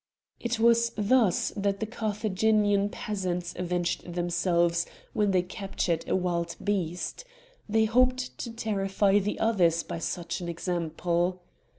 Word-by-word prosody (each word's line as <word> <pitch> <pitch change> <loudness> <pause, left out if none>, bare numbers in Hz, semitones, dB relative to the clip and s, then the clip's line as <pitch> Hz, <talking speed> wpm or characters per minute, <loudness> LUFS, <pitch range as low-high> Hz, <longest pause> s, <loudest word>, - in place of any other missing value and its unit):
It 235 0 -1
was 235 +1 +4
thus 215 -2 +3
that 200 -1 0
the 220 - -1
Carthaginian 210 -2 +1
peasants 180 -5 -3
avenged 175 -1 -2
themselves 175 -1 +1 0.3
when 210 -1 +2
they 185 -2 +3
captured 185 -3 -2
a - - +2
wild 170 -2 -1
beast; 185 - -2 0.5
they 220 +1 +3
hoped 255 +2 +2
to 235 - -4
terrify 205 -3 +1
the 205 +1 -2
others 175 -7 +3
by - - -5
such 175 +2 -3
an 175 - -4
example. 175 +1 -1
195 Hz, 125 wpm, -28 LUFS, 175-220 Hz, 0.5 s, was